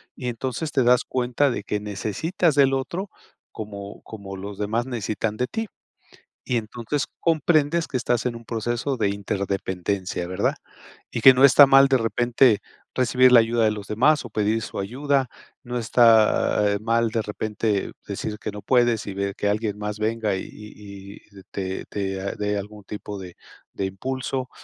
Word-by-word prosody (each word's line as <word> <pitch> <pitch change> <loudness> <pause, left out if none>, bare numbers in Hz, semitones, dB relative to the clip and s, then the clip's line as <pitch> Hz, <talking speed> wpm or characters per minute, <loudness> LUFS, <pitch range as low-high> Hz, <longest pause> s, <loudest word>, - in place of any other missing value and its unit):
Y 125 - -6
entonces, 130 +5 -3
te 135 - +2
das 125 +1 +4
cuenta 125 +3 +1
de 100 - -4
que 105 +1 -2
necesitas 110 - -1
del 135 -2 +4
otro, 175 +9 -4 0.4
como 100 -2 -8
como 100 -3 -9
los 100 +1 -8
demás, 110 +3 -1
necesitan 110 -3 -3
de 125 - 0
ti. 225 - -4 0.8
Y 125 - 0
entonces, 120 +5 -3 0.2
comprendes 160 -1 +2
que - - -8
estás 120 -1 0
en 120 -1 -1
un 115 - -10
proceso 120 +4 -2
de 110 -3 +1
interdependencia, 95 -2 -3
¿verdad? 90 +1 0 0.6
Y 115 - -3
que 130 - +9
no 130 +2 +6
está 140 +1 +8
mal 135 0 +7
de 135 - +3
repente, 120 0 +3 0.4
recibir 130 0 +4
la 120 - +9
ayuda 115 +1 +1
de 110 - +3
los 105 -1 -7
demás, 140 +7 +2
o - - -8
pedir 110 +1 0
su - - -7
ayuda. 135 +6 0 0.4
No 125 0 -4
está, 110 -3 +4
eh, - - -3
mal, 115 +1 +1
de 115 -1 0
repente, 105 -1 -2
decir 105 -1 -4
que - - -4
no 105 0 -8
puedes, 120 -3 +2
y 100 - -4
ver 100 0 -2
que 105 - -2
alguien 105 0 -1
más 105 0 -5
venga, 110 -2 0
y 95 - -3
y 100 -2 -11 0.2
y 95 -1 -14
te 95 -1 -4
te 95 -1 -4
dé 105 0 -1
algún 105 +1 -8
tipo 105 0 -7
de 90 -2 -10 0.4
de 95 - -2
impulso. 130 +6 -4
110 Hz, 175 wpm, -24 LUFS, 100-130 Hz, 0.8 s, que